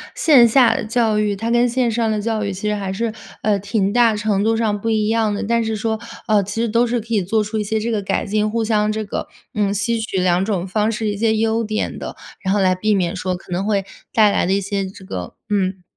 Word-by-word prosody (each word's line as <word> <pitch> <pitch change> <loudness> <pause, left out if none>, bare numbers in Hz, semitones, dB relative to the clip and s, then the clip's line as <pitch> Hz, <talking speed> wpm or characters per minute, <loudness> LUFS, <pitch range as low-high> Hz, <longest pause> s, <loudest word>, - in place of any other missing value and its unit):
线 260 -7 +6
下 245 0 +5
的 - - -2
教 225 -1 +1
育， 210 -1 +1
它 225 +4 -3
跟 240 +1 +3
线 245 0 +1
上 225 -1 0
的 210 -1 -1
教 220 -1 -1
育 200 -1 -2
其 200 +3 -3
实 210 - 0
还 195 -2 -3
是， 225 +3 -1 0.3
呃， 210 -2 +2
挺 200 0 0
大 235 -1 +4
程 210 -1 0
度 225 +1 +2
上 215 -2 0
不 225 - -2
一 215 -1 +1
样 220 -2 +1
的， 205 - -3
但 230 +2 +1
是 220 0 -2
说， 220 +1 -2 0.3
呃， 210 -2 +3
其 205 +4 -3
实 235 - 0
都 235 +3 +3
是 240 0 0
可 225 - -16
以 210 -5 +1
做 215 +4 +1
出 215 +1 -4
一 210 - 0
些 220 +2 -1
这 230 +2 -2
个 215 -2 0
改 - - -1
进， 210 +1 0
互 230 +1 -1
相 215 -1 +1
这 215 0 -2
个， 200 - -4 0.3
嗯， 205 -1 +1
吸 230 +3 0
取 220 -3 -3
两 180 +1 +2
种 195 -4 -2
方 210 +3 0
式， 220 -1 -2
一 205 - -3
些 220 +1 +2
优 225 +1 +1
点 215 0 -2
的， - - -6 0.3
然 190 0 0
后 205 - +2
来 185 -1 +3
避 210 +4 +1
免 180 -3 0
说 185 0 -2
可 180 - -13
能 180 +3 -1
会 200 -2 0 0.3
带 215 -2 +5
来 - - +1
的 190 - +1
一 200 - +1
些 195 0 -2
这 190 0 -10
个 90 - -6 0.2
嗯， 190 -2 -1
215 Hz, 290 characters per minute, -20 LUFS, 200-225 Hz, 0.3 s, 线